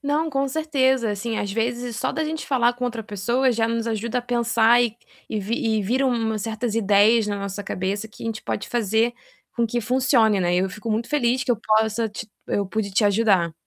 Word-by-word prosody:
Não, 300 +3 0
com 275 0 0
certeza, 265 -6 +1
assim, 220 +2 -3
às 200 - -2
vezes 235 +1 -2
só - - -1
da 315 +3 -1
gente 315 0 -4
falar 245 -3 +2
com 250 0 -4
outra 230 -2 -3
pessoa 235 +6 0
já 225 0 +1
nos 230 0 -2
ajuda 230 +2 -1
a - - -4
pensar 235 -1 +3
e 230 -1 -1 0.3
e 215 - -2
vi 215 +4 -2 0.2
e - - -1
vira 260 +7 +1
umas 225 -4 -1
certas 225 0 -3
ideias 210 +1 +4
na 205 -1 -2
nossa 200 +1 -5
cabeça 200 +3 -3
que - - -14
a - - -4
gente 220 -1 -4
pode - - -4
fazer 230 0 +1 0.4
com 235 -1 +2
que 240 +2 -2
funcione, 235 -4 +3
né, 175 0 +1
e - - +3
eu 190 +1 +1
fico 220 +3 -6
muito 225 +2 -1
feliz 260 -3 +1
que - - -2
eu 240 - +3
possa 220 +1 +1
te 210 +1 -8 0.2
eu 200 - 0
pude 205 0 -3
te 210 +2 +2
ajudar. 200 -5 +3
230 Hz, 225 wpm, -23 LUFS, 210-245 Hz, 0.4 s, ideias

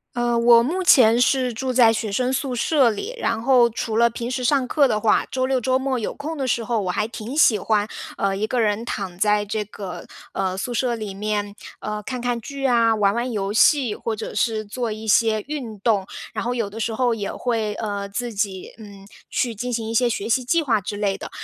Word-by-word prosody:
呃， 240 0 +1
我 235 0 +6
目 340 +10 -1
前 240 -8 +6
是 250 -1 +2
住 255 +3 -2
在 240 -2 +6
学 220 -2 -2
生 250 +5 0
宿 265 0 -2
舍 255 0 +3
里， 405 - -5
然 230 - -1
后 245 -1 +4
除 220 0 -3
了 235 +1 +4
平 235 +1 -5
时 255 0 -2
上 260 0 +2
课 290 +1 +4
的 215 -4 0
话， 215 - +3
周 260 0 0
六 265 0 +1
周 255 +2 +1
末 265 -1 -1
有 220 - -3
空 310 +3 -6
的 270 -3 -2
时 235 -1 0
候， 230 0 -1
我 185 - -2
还 210 - -1
挺 230 +2 -7
喜 260 -8 +5
欢， 210 +1 0 0.3
呃， 195 -1 0
一 210 +2 -1
个 245 +2 -1
人 215 0 0
躺 195 -6 -5
在 210 +1 +2
这 210 +1 -2
个， 200 -2 -8 0.3
呃， 190 -1 -1
宿 240 +6 -4
舍 240 +1 0
里 215 -4 -6
面， 205 0 -2 0.3
呃， 210 0 -4
看 250 +4 -5
看 245 0 -1
剧 275 +3 -3
啊， 230 -3 +3
玩 205 -2 +2
玩 240 +1 -2
游 200 -2 -2
戏， 255 -2 +4
或 225 - -3
者 220 - -6
是 220 -2 0
做 230 +2 -3
一 220 +1 -7
些 215 0 +3
运 250 -8 -5
动， 205 -3 +1 0.3
然 - - -3
后 245 - -1
有 230 -4 -1
的 210 +3 -9
时 225 0 -2
候 245 0 +1
也 205 -3 -4
会， 225 -4 -1
呃， 205 -2 -4
自 230 +4 -4
己， 195 -2 -3
嗯， 200 -3 -13 0.2
去 240 -2 -1
进 245 +4 -4
行 225 -2 -2
一 225 - -4
些 240 +1 +3
学 210 -1 -3
习 250 +2 +1
计 330 +7 +2
划 235 -7 +2
之 205 - -5
类 200 -2 0
的。 - - -8
230 Hz, 250 characters per minute, -22 LUFS, 210-250 Hz, 0.3 s, 我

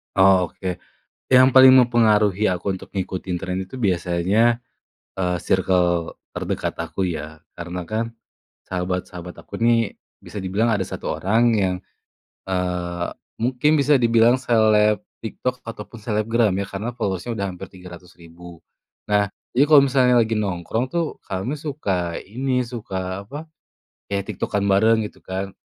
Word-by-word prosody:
Oh, 95 -1 +5
oke. 90 +1 -5 0.5
Yang 130 0 +7
paling 130 0 +9
mempengaruhi 110 -4 +3
aku 95 +2 -1
untuk 95 +1 -10
ngikutin 95 -1 -3
tren 90 0 -3
itu 95 +7 -10
biasanya, 95 +3 +2 0.6
eee, 90 -1 0
sirkel 90 -2 +1 0.2
terdekat - - -3
aku 85 +3 -2
ya. 80 -3 -5 0.2
Karena 90 +1 -6
kan, 115 +3 -3 0.5
sahabat-sahabat 90 -1 -4
aku - - -9
nih 115 -2 +2 0.2
bisa 105 - -9
dibilang 100 +4 0
ada 100 -4 +1
1 - - -4
orang 110 +5 +1
yang, 95 -3 +1 0.7
eee, 90 -2 -2 0.3
mungkin 125 +5 +1
bisa 140 -1 +4
dibilang 115 +1 +4
seleb 110 -3 +3 0.2
TikTok 125 +3 -4
ataupun 115 0 -9
selebgram 110 +1 +1
ya, 100 - -1
karena 100 +4 -5
followers-nya 100 +2 -3
sudah 100 - -1
hampir 90 - -9
300.000. 90 -2 -13 0.5
Nah, 105 -1 +3 0.2
jadi 140 +4 +4
kalau 150 -2 +8
misalnya 130 -2 +3
lagi 115 -1 +2
nongkrong 100 +5 -2
tuh 170 +1 0 0.2
kami 95 +8 -3
suka, 100 - -2
ini, 125 +4 -1
suka, 95 -5 -5
apa, 145 +6 -7 0.7
ya 100 - +1
TikTok-an 100 0 -2
bareng 110 +3 +3
gitu - - -15
kan. 95 +1 -4
100 Hz, 135 wpm, -22 LUFS, 90-115 Hz, 0.7 s, paling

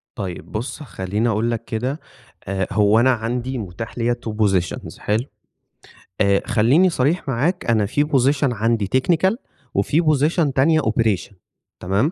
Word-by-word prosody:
طيب 95 -6 -6
بُص 120 +7 -5
خلّيني 105 -1 -2
أقول 115 +2 0
لك 115 0 -4
كده 125 +7 -3 0.5
آآ 95 -1 -1
هو 105 +1 +4
أنا 130 +2 +4
عندي 120 +2 -2
متاح 110 +2 -7
ليّا 120 +1 +1
two - - -1
positions، 95 -4 -1
حلو؟ 110 +4 -1 1.0
آآ 100 -1 +3
خلّيني 140 +13 +4
صريح 155 +1 0
معاك 145 +9 0
أنا 110 -3 +2
في 145 +8 +1
position 140 -1 +2
عندي 110 -2 0
technical 175 - +2 0.4
وفي 120 - +2
position 155 -1 +2
تانية 155 +4 +4
operation، 110 -4 0 0.5
تمام؟ 100 - 0
115 Hz, 145 wpm, -21 LUFS, 105-140 Hz, 1.0 s, هو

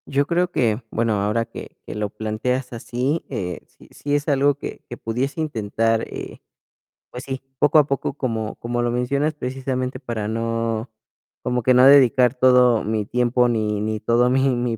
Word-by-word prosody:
Yo 140 +1 +1
creo 175 +3 +1
que, 115 -6 +1
bueno, 115 0 0
ahora 105 +3 0
que - - -11
que - - -7
lo 105 -1 -2
planteas 110 +5 -3
así, 125 +6 -2
eh, 90 -9 -4
sí, - - -20
sí 145 0 -2
es 145 0 -1
algo 140 -1 +3
que 145 - -8
que 120 - -7
pudiese 125 +7 -3
intentar, 115 -5 0
eh, - - -7 0.7
pues, 125 +2 -8
sí, 135 -1 -5 0.2
poco 150 +1 +5
a 150 - +4
poco, 140 -1 -2
como 115 -6 -3
como 120 +1 -3
lo 120 0 0
mencionas, 140 +5 0
precisamente 130 -2 -3
para 115 -5 -4
no 115 0 -2 0.5
como 125 -1 -1
que 130 - +4
no 125 +1 +6
dedicar 130 -3 +6
todo 125 -2 +4
mi 110 -1 -1
tiempo 125 +2 +2
ni 105 -3 -1
ni 110 0 -2
todo 120 +3 +2
mi 130 0 +2
mi 120 -1 -1
125 Hz, 180 wpm, -22 LUFS, 115-135 Hz, 0.7 s, no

